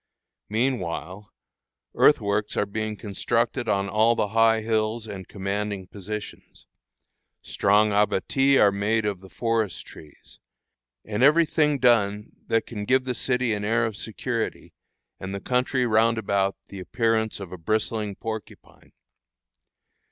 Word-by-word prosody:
Meanwhile, 105 -5 -2 0.6
earthworks 105 -6 +2
are - - +2
being 110 +1 -4
constructed 115 +4 -1
on 100 -1 +1
all 110 +3 +3
the 105 - 0
high 115 +1 +3
hills 110 0 -1
and 100 -4 -8
commanding 100 0 -3
positions; 105 +3 -8 0.8
strong 105 +2 +2
abatis 120 +7 +2
are 100 - +6
made 105 +2 0
of 100 -3 -2
the 95 0 -14
forest 115 -4 -2
trees, 75 -2 -15 0.7
and 105 +2 -3
every 155 +5 +6
thing 150 -2 +1
done 105 -5 +2 0.2
that 115 - +1
can 105 -3 -6
give 130 +3 +3
the 125 -1 -2
city 125 -1 0
an 105 -1 -3
air 115 +2 +1
of 110 -2 -4
security, 115 +2 -4 0.5
and 95 +1 -5
the - - -4
country 125 +3 0
round 115 0 +3
about 100 -2 0
the 100 - -8
appearance 110 +2 0
of 95 -3 -8
a 90 - -7
bristling 110 +2 -1
porcupine. 110 0 -9
110 Hz, 135 wpm, -25 LUFS, 100-115 Hz, 0.8 s, are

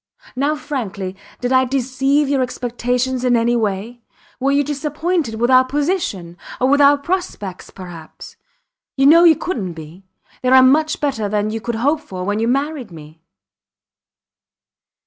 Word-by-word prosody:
Now 285 +4 0
frankly; 205 -11 -5 0.3
did 245 0 -1
I 260 0 +5
deceive 270 +2 0
your 275 -1 +1
expectations 250 +1 -2
in 250 -1 +3
any 235 +1 +1
way? 220 +2 -3 0.4
Were 270 +1 +1
you 285 +1 +2
disappointed 300 -1 -2
with 240 +3 0
our 255 0 +7
position 260 - -2 0.2
or 255 - +2
with 285 +1 +4
our 285 0 +6
prospects 280 - -4
perhaps? 175 -4 -11 0.6
You 270 - +3
know 335 +4 +7
you 325 -2 +7
couldnt 205 - -4
be 165 +4 -12 0.3
they 255 - 0
are 260 0 +7
much 305 +5 +3
better 260 -8 -1
than 210 +1 -1
you 225 0 -4
could 235 +1 -3
hope 285 +7 +1
for 185 -9 -7
when 205 +3 -1
you 225 - 0
married 275 0 -1
me. 160 -1 -13
255 Hz, 155 wpm, -19 LUFS, 210-285 Hz, 0.6 s, our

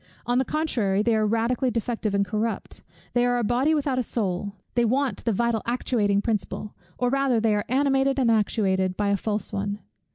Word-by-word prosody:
On 245 +1 +2
the 265 - +1
contrary, 230 -11 0
they 230 0 +2
are 215 -1 +2
radically 235 +4 +1
defective 230 -3 -2
and 200 0 +2
corrupt; 215 +3 -3 0.3
they 245 - +3
are 245 0 +2
a 240 - 0
body 255 +8 +2
without 275 -3 0
a - - +3
soul; 200 -4 -2 0.2
they 240 - +2
want 260 +3 0
the 230 - +2
vital 230 +1 0
actuating 210 -4 +1
principle, 210 -1 -3 0.2
or 245 0 0
rather 275 -3 +2
they 220 -1 +2
are 205 0 0
animated 270 +1 +2
and 250 -4 +3
actuated 190 -4 +1
by 205 -1 +1
a 200 - +3
false 210 +2 -3
one. 200 0 -2
230 Hz, 195 wpm, -25 LUFS, 205-250 Hz, 0.3 s, they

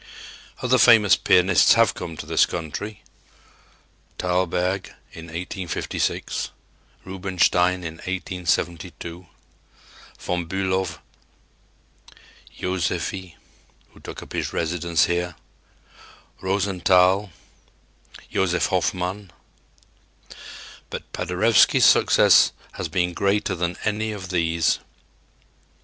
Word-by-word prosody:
Other 125 0 +3
famous 110 -4 +6
pianists 90 -2 +4
have 115 -2 +4
come 85 -3 -7
to - - -7
this - - +3
country 85 +6 -6 1.1
Thalberg 90 +1 -1 0.2
in 80 - -10
1856; 85 +1 -3 0.6
Rubinstein 90 -1 +1
in 80 -1 -6
1872; 90 -1 -4 0.9
Von 90 -2 -3
Bülow, 95 0 -1 1.6
Joseffy, 90 0 -3 0.6
who - - -18
took - - -9
up - - -13
his - - -2
residence 85 -1 0
here; 85 -1 -2 1.1
Rosenthal, 95 0 +2 1.0
Josef 90 -2 +1
Hofmann. 95 +2 -2 1.6
But - - -8
Paderewski's - - +3
success - - +5 0.2
has 95 - -5
been 90 +2 -1
greater 100 +2 0
than 85 0 -2
any 110 +1 -1
of 95 -3 -8
these. 85 -3 +1
90 Hz, 85 wpm, -23 LUFS, 85-95 Hz, 1.6 s, famous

